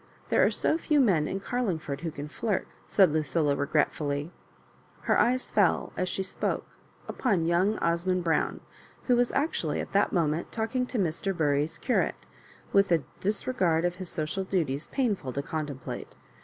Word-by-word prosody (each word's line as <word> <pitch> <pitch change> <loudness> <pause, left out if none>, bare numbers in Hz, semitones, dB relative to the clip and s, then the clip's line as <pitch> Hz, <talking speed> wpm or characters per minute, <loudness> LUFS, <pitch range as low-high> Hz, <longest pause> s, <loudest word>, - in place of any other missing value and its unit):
There - - +4
are - - +5
so 320 - +1
few 300 -2 +2
men 180 - +3
in 195 - -2
Carlingford 175 - -2
who 170 - -2
can 145 -1 -6
flirt," 205 +6 -2 0.2
said 190 -6 +5
Lucilla, 150 -1 +1
regret 145 +2 +1
fully. 145 +2 -3 0.7
Qer - - +3
eyes 255 +2 +2
f?U 195 -5 +3
(us 185 0 -1
she 190 - -1
spoke 190 - -2 0.4
upon 195 -10 0
young 180 +6 +2
Osmond 175 +2 0
Brown, 165 -1 0 0.4
who 250 - +3
was 245 0 +2
actually 300 +4 0
at - - -5
that - - +3
mo 170 -4 +2
ment 155 +3 -2
talking 235 +3 -1
to 245 - -3
Mr. 190 0 -1
Bury's 150 -1 +1
curate, 255 - 0 0.5
with 200 -1 +4
a 165 -4 +3 0.2
disre 215 +6 -1
gard 170 -4 +2
of 175 0 -1
his 185 -2 -6
social 160 +5 -2
duties 160 -7 -1
painful 205 - -1
to 140 - -2
contemplate. 145 -5 -5
175 Hz, 170 wpm, -28 LUFS, 155-205 Hz, 0.7 s, are